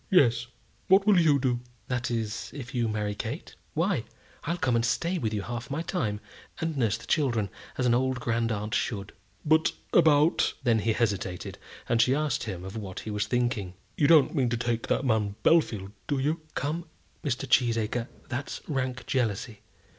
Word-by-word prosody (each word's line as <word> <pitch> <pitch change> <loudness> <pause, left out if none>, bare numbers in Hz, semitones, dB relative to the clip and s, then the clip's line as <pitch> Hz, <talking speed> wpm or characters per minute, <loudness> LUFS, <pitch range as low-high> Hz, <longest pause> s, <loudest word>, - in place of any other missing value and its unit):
"Yes; 120 - +4 0.4
what 195 +1 +6
will 205 -4 +6
you 155 -4 +5
do?" 125 -3 0 0.3
"That 125 0 -1
is, 115 -2 -2
if 135 -3 -7
you 120 -2 +1
marry 105 -1 -1
Kate? 115 +8 -5 0.2
Why, 165 - +1 0.4
I'll 170 +3 -1
come 130 -7 +1
and 115 - +2
stay 170 +9 0
with 110 -6 -1
you 105 -2 -2
half 120 +3 -5
my 150 +4 -2
time, 110 - -1 0.4
and 165 -1 -1
nurse 115 -6 +1
the - - -12
children, 120 - +1 0.3
as 125 - +1
an 120 - +4
old 130 +1 +1
grand 115 -1 0
aunt 105 0 -3
should." 100 -3 -2 0.3
"But 160 +1 +4 0.2
about 155 -1 +4
." - - -33
Then 115 -3 +3
he 110 +1 +1
hesitated, 100 -6 -2 0.3
and 115 -1 +3
she 125 +3 +4
asked 150 -4 0
him 95 -5 -5
of 95 - -7
what 100 -4 -5
he 110 - -5
was 105 0 -1
thinking. 110 -6 -1 0.2
"You 145 - +3
don't 150 -4 +6
mean 130 -5 +2
to 120 - 0
take 115 0 -1
that 135 - +1
man 110 -4 +1
Bellfield, 110 - +3 0.2
do 145 - 0
you?" 150 +5 0 0.2
"Come, 160 +4 -2 0.4
Mr. 135 -1 -1
Cheesacre, 115 -1 +2 0.2
that's 130 +3 -4
rank 130 -4 -2
jealousy. 115 -3 -1
120 Hz, 185 wpm, -28 LUFS, 110-145 Hz, 0.4 s, what